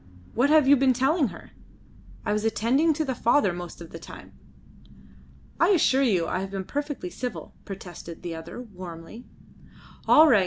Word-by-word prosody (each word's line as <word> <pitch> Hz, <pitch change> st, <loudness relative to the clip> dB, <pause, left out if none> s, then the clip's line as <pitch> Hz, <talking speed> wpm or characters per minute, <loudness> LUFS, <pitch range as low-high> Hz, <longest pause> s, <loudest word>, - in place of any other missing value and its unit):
What 255 Hz, +5 st, +2 dB
have 305 Hz, -3 st, +5 dB
you 285 Hz, -, +8 dB
been 265 Hz, -1 st, +3 dB
telling 270 Hz, +4 st, +2 dB
her? -, -, -11 dB, 0.7 s
I 210 Hz, -, +1 dB
was 210 Hz, 0 st, -1 dB
attending 235 Hz, +8 st, +2 dB
to 310 Hz, +1 st, -1 dB
the 265 Hz, -, -1 dB
father 235 Hz, -4 st, +2 dB
most 175 Hz, 0 st, -8 dB
of 165 Hz, -, -10 dB
the 165 Hz, -, -8 dB
time." -, -, -12 dB, 1.3 s
"I -, -, +5 dB
assure 300 Hz, -8 st, +4 dB
you 195 Hz, -11 st, +2 dB
I 185 Hz, -, -2 dB
have 190 Hz, 0 st, -4 dB
been 195 Hz, -1 st, -4 dB
perfectly 290 Hz, -10 st, -4 dB
civil," 250 Hz, -2 st, -6 dB
protested 180 Hz, -3 st, -9 dB
the 175 Hz, -1 st, -4 dB
other 165 Hz, +7 st, -8 dB
warmly. 185 Hz, -1 st, -10 dB, 0.8 s
"All 315 Hz, +1 st, +8 dB
right. 240 Hz, -8 st, +6 dB
225 Hz, 170 wpm, -26 LUFS, 180-275 Hz, 1.3 s, you